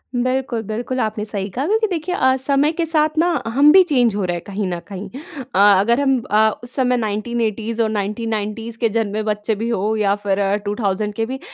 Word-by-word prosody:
बिल्कुल, 255 -1 -1
बिल्कुल 245 +4 -3
आपने 215 -2 -1
सही 200 -2 -4
कहा। 260 +8 -3
क्योंकि 440 +1 +2
देखिए 360 -1 -3
अ, 260 -5 +3
समय 280 +3 +1
के 330 0 -2
साथ 310 -1 +2
ना 335 - +3 0.2
हम 280 +6 +5
भी 380 +2 +8
चेंज 245 - +2
हो 205 - -1
रहे 175 -1 -1
हैं - - -9
कहीं 200 0 -3
न 175 -1 -3
कहीं। 200 0 -7 0.5
अ - - +3 0.2
अगर 235 +6 +2
हम 270 -2 +3
अ, 220 +1 +5
उस 240 - -5
समय 250 -2 +2
1980s 225 +1 -2
और 220 - +1
1990s 220 +1 -3
के 230 -1 +1
जन्मे 215 -1 -1
बच्चे 210 0 -1
भी 225 +3 -3
हो 220 0 0
या 200 -1 +2
फिर 195 -1 0 0.3
2000 205 0 -1
के 225 - -1
भी। 260 +3 -5
225 Hz, 210 wpm, -20 LUFS, 210-260 Hz, 0.5 s, भी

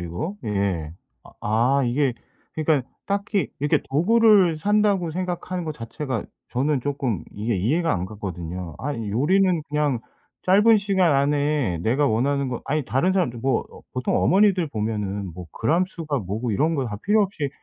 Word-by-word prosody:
이거. 90 - -4
예. 100 -7 -1 0.3
아 - - -14
아 120 +6 +2
이게 130 +2 +1 0.4
그러니까 150 -5 +1 0.2
딱히 200 0 0
이렇게 145 +1 +2
도구를 195 +2 +4
산다고 200 -1 +2
생각하는 180 0 -3
거 155 - -3
자체가 115 -1 -4 0.2
저는 135 +2 0
쪼끔 130 -7 -2
이해 110 +1 -2
이해가 155 - +1
안 90 - -1
갔거든요. 90 -4 -6
아 145 +2 -3
요리는 155 - +1
그냥 145 -4 0 0.4
짧은 210 +4 +5
시간 190 -6 +2
안에 140 - +1
내가 130 - +1
원하는 135 +4 +1
거 125 -2 -4
아니 150 0 -1
다른 150 +11 +1
사람들 170 -11 0
뭐 130 +1 +1
어 - - -13
보통 125 -1 0
어머니들 190 -2 +4
보면은 105 -5 -3
뭐 90 +1 -9
그램 165 +10 +1
수가 155 -6 -3
뭐고 110 +3 -3
이런 155 +11 +1
거 135 -4 0
다 105 -3 -4
필요 210 +2 +4
없이 185 -8 -2
140 Hz, 325 characters per minute, -23 LUFS, 110-175 Hz, 0.4 s, 짧은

